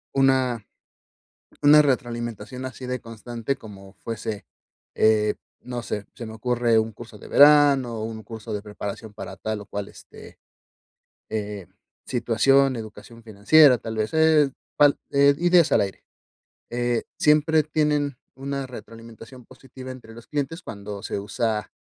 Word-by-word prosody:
una 130 -4 +2 1.0
una 150 +1 +8
retroalimentación 120 -2 -3
así 130 0 -7
de 125 0 -3
constante 115 +3 -5
como 100 -5 -13
fuese, 110 -3 -6 0.5
eh, 105 -1 +3 0.3
no 125 -1 -5
sé. 105 -1 -4
Se 120 - -8
me 110 - -8
ocurre 120 0 +1
un 110 0 -2
curso 110 0 -12
de - - -13
verano 145 -4 +5
o - - -4
un 110 0 -6
curso 110 -2 -9
de 105 - -3
preparación 105 +1 -7
para 105 - -8
tal 110 -1 -4
o - - -11
cual, 100 0 -5
este, - - -14 0.9
eh, 105 -3 -5 0.4
situación, 130 +3 +2
educación 110 +1 -10
financiera, 125 +6 +5
tal 110 0 -6
vez 110 +6 -2
es 160 -3 +4 0.3
al 145 -1 +6
eh, 140 0 +5
ideas 175 -3 +4
al - - +5
aire. 95 -1 -6 0.7
Eh, 120 -1 0 0.2
siempre 155 +1 +4
tienen 150 -2 0 0.2
una 140 0 -4
retroalimentación 115 +1 -12
positiva 130 0 -12
entre 125 -3 -11
los 115 0 -13
clientes 150 +4 -3
cuando 100 - -8
se - - -4
usa, 105 +1 -2
120 Hz, 145 wpm, -24 LUFS, 110-135 Hz, 1.0 s, una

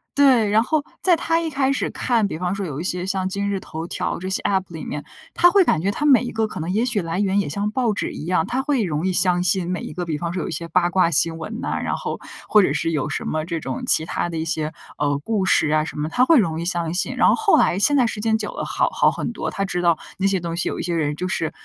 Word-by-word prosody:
对， 260 -7 +4
然 215 +1 +4
后 305 +3 0 0.2
在 365 -2 +4
她 330 0 0
一 330 - -2
开 275 -2 +1
始 - - -1
看， 230 -4 0
比 180 - -5
方 180 +2 -2
说 200 0 -4
有 145 -2 -5
一 - - -4
些 180 0 -1
像 190 0 -1
今 200 +1 -2
日 200 -1 -1
头 160 -2 -7
条 - - -3
这 185 +2 -5
些 190 - -1
App 190 -2 +1
里 160 -3 -7
面， 145 0 -5 0.3
她 350 - +5
会 395 +1 +5
感 155 - +1
觉 190 - 0
它 250 +9 -2
每 275 -4 +6
一 245 - -4
个， 220 0 0
可 - - -7
能 160 +2 -4
也 220 +5 +1
许 225 -5 0
来 165 +1 -3
源 200 0 +1
也 195 - -1
像 205 +6 -2
报 235 -1 0
纸 - - -3
一 - - -7
样， 175 -2 +1
她 255 +2 -1
会 275 -4 0
容 160 -1 -1
易 - - +1
相 180 0 +3
信 180 -1 +1
每 180 - -3
一 - - -7
个， 180 -1 -4
比 155 -3 -3
方 170 +1 -3
说 175 -2 -3
有 - - -4
一 - - -5
些 170 - -4
八 175 +1 +1
卦 185 -2 +3
新 165 +1 +2
闻 220 +8 -6
呐， - - -2
然 - - -1
后 - - -5 0.3
或 210 - +5
者 165 -7 +1
是 165 +2 -1
有 150 -1 -1
什 145 - -3
么 155 0 -2
这 170 -1 -3
种， 130 -4 -5
其 160 - +5
他 175 - -2
的 165 - -5
一 160 - -2
些， 155 -1 -1 0.3
呃， 145 -1 +1
故 210 -1 0
事 155 - +4
啊 155 0 +2
什 155 - -7
么， 150 - -1
她 245 - +2
会 325 +3 +5
容 165 -8 +1
易 - - -4
相 170 -2 -1
信。 180 - 0
然 - - +4
后 - - +5
后 435 -2 +3
来， 180 - +2
现 290 +7 +4
在 255 - +4
时 220 -2 -3
间 220 0 +2
久 215 -1 -4
了， - - -5
好 - - 0
好 - - +3
很 - - -4
多， - - -4
她 195 - -2
知 180 -2 -2
道 170 -2 +3 0.2
那 195 - +2
些 195 -1 +1
东 170 -1 -4
西， 175 - -1
有 - - -5
一 - - -3
些 175 -1 -1
人 150 -2 -1
就 180 +4 -3
是， 165 -4 -2
185 Hz, 335 characters per minute, -22 LUFS, 165-220 Hz, 0.3 s, 每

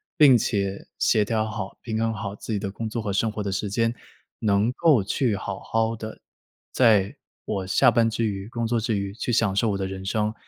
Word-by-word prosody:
并 140 -6 +7
且 100 -3 -2
协 105 -1 +3
调 110 0 0
好、 105 -3 -5
平 110 -2 -3
衡 115 0 0
好 100 -2 -5
自 110 +2 -6
己 - - +1
的 100 -1 -4
工 110 +2 -5
作 115 +1 -3
和 105 - -3
生 105 +3 +1
活 105 -1 -4
的 100 - -2
时 100 +1 -2
间， 115 +3 +1 0.5
能 105 +1 +2
够 140 - +3
去 115 +1 0
好 95 0 -5
好 115 0 0
地 110 0 -8 0.5
在 105 -6 +3 0.3
我 95 -3 -3
下 125 +5 +5
班 115 0 +3
之 115 +1 -2
余、 100 -1 -3
工 115 0 -3
作 115 0 +1
之 110 -1 -1
余 100 0 -3
去 120 - -3
享 110 -4 +2
受 110 +2 +2
我 100 - -1
的 95 - -2
人 95 0 -6
生， 105 +2 0
110 Hz, 240 characters per minute, -25 LUFS, 100-115 Hz, 0.5 s, 并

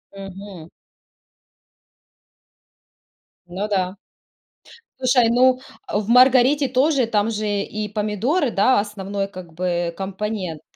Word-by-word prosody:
Мгм. 195 -3 -10 2.8
Ну 185 +4 -4
да. 185 -1 -1 1.0
Слушай, 250 -2 +3
ну 255 +2 +4 0.3
в 205 -1 -1
"Маргарите" 255 +3 +5
тоже 260 +1 +2
там 220 -1 0
же 215 -1 -3
и 210 +1 -3
помидоры, 215 - -1
да, 215 +3 +3
основной 200 -1 -4
как 180 -4 -11
бы 175 0 -2
компонент. 190 -3 -4
210 Hz, 95 wpm, -21 LUFS, 195-245 Hz, 2.8 s, Маргарите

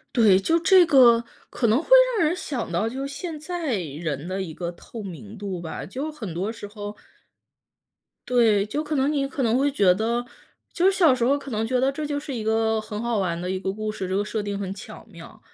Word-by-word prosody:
对， 210 -6 +6
就 325 +13 +2
这 365 +1 +6
个 250 -7 +6 0.3
可 235 - 0
能 220 +2 +4
会 - - -17 0.3
让 340 - +3
人 310 - +2
想 260 - -4
到 175 +6 0
就 265 +4 -4
现 310 +4 -6
在 315 -4 -3
人 155 -2 -4
的 190 +1 -2
一 170 -4 -5
个 170 +1 -4
透 210 +5 -10
明 200 +3 -9
度 195 -3 -5
吧， 165 -2 -6
就 270 +10 -5
很 230 - -7
多 185 +5 -2
时 220 -2 -7
候 205 0 -7 1.3
对， 225 -5 +3
就 290 +9 -3
可 305 0 -3
能 275 +1 +2
你 280 -2 0
可 275 0 -3
能 230 -1 +2
会 285 +2 +2
觉 200 -9 +4
得 235 +5 -1 0.5
就 350 - +1
是 - - +2
小 330 -8 +6
时 250 -2 -1
候 275 +4 +3
可 275 -1 -9
能 220 0 -1
觉 250 +2 0
得， 265 +2 +2
这 305 +3 -5
就 290 -1 -2
是 285 -1 -7
一 230 -3 -4
个 220 0 +1
很 210 -1 -6
好 235 -2 0
玩 170 -3 -1
的 180 +1 -4
一 190 - -2
个 190 - -2
故 215 +2 -4
事， 195 -3 -5
这 190 - -1
个 205 - 0
设 215 +1 -2
定 205 -1 -4
很 195 -1 -4
巧 195 - -11
妙。 - - -13
225 Hz, 255 characters per minute, -24 LUFS, 195-275 Hz, 1.3 s, 对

